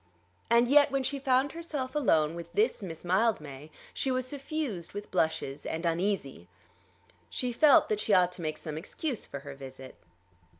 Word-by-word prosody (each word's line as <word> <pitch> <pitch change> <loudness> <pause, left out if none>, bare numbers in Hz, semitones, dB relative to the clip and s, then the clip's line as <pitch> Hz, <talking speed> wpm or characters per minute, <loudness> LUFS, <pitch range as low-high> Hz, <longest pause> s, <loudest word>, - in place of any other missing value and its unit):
And 235 +1 +5
yet, 285 +2 +6
when 275 -1 0
she 280 +2 -1
found 265 +1 +2
herself 300 -6 -5
alone 165 - +2
with 170 0 -8
this 425 - +2
Miss 175 -3 -7
Mildmay, 165 - 0 0.2
she 270 - -1
was 255 -1 0
suffused 275 - -4
with 205 +1 -7
blushes 150 -3 -1
and 165 +2 -4
uneasy. 165 - -1 0.8
She 250 -1 -2
felt 290 +3 +6
that 215 - 0
she 215 - -2
ought 180 -2 +5
to 180 - -10
make 155 -1 -3
some 155 -1 -6
excuse 250 - -4
for 140 - -7
her 140 0 -8
visit. 135 -1 -10
205 Hz, 170 wpm, -29 LUFS, 160-265 Hz, 0.8 s, yet